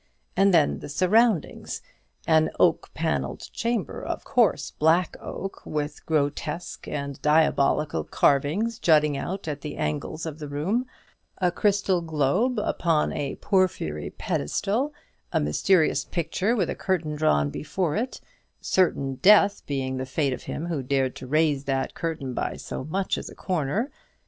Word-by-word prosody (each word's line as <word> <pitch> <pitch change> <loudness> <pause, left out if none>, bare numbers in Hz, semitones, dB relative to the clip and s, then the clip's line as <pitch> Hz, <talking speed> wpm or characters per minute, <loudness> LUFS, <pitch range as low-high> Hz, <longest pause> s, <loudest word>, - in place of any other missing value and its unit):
And 195 0 +5
then 160 -5 +3
the - - -8
surroundings. 190 +4 +1 0.4
An 160 -1 +4
oak - - +3
panelled - - -1
chamber, 230 - -2
of - - -4
course - - +2
black 165 +3 +2
oak, 195 - -6
with 150 -1 -4
grotesque 150 +2 -2
and 140 -1 -4
diabolic 150 -1 +3 0.2
carvings 180 +12 +2
jutting 150 -5 +4
out 185 +7 -4
at 145 -2 -3
the 150 0 -6
angles 75 - -3
of 160 -1 -6
the 150 - -6
room; 185 - -1 0.5
a 180 -2 +2
crystal 195 -1 +1
globe 165 - +1
upon 165 -6 +1
a 140 -2 -3
porphyry 180 - 0
pedestal; 210 - -1 0.4
a - - +2
mysterious 155 - +2
picture, 180 +7 -1
with 190 -7 0
a - - -3
curtain 175 -5 -1
drawn 75 - +2
before 155 - -2
it 240 +5 -2 0.4
certain 140 -8 +1
death 200 +2 +5
being 130 -2 -2
the 130 0 -4
fate 140 0 0
of - - -6
him 160 - -4
who 165 -5 -2
dared 130 0 0
to 130 - -8
raise 150 -1 +2
that 135 -1 -1
curtain 160 -6 -3
by - - -2
so - - -6
much 190 +5 -1
as - - -7
a - - -12
corner. 185 - -1
155 Hz, 150 wpm, -25 LUFS, 140-190 Hz, 0.5 s, And